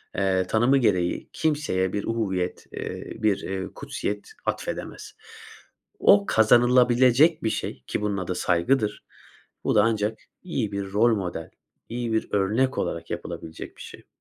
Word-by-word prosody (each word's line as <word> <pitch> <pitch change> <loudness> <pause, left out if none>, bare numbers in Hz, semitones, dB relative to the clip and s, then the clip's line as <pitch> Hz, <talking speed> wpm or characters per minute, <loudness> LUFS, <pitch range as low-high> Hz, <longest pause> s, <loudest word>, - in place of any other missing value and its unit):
eee, 95 -1 +1
tanımı 120 +7 +3
gereği 90 -8 +1
kimseye 145 - 0
bir 100 - -1
uhuvvet, 95 -6 -2
eee, - - -6
bir, 105 -3 +3
eee, 95 0 -4
kutsiyet 105 0 -4 0.2
atfedemez. - - -4 0.9
O 100 0 +6
kazanılabilecek 125 +6 +5
bir 110 - +1
şey, 65 - -4
ki - - -2
bunun 105 -1 -1
adı 90 -1 -3
saygıdır. 105 +6 +1 0.6
Bu - - +1
da 105 - +6
ancak 110 -1 0 0.2
iyi 130 - -2
bir 100 -1 -4
rol 115 +2 +4
model, 90 -4 -5 0.4
iyi 120 -1 -3
bir 110 - 0
örnek 110 +7 +1
olarak 85 - -3
yapılabilecek 80 - -7
bir - - -12
şey. - - -11
105 Hz, 140 wpm, -25 LUFS, 95-120 Hz, 0.9 s, O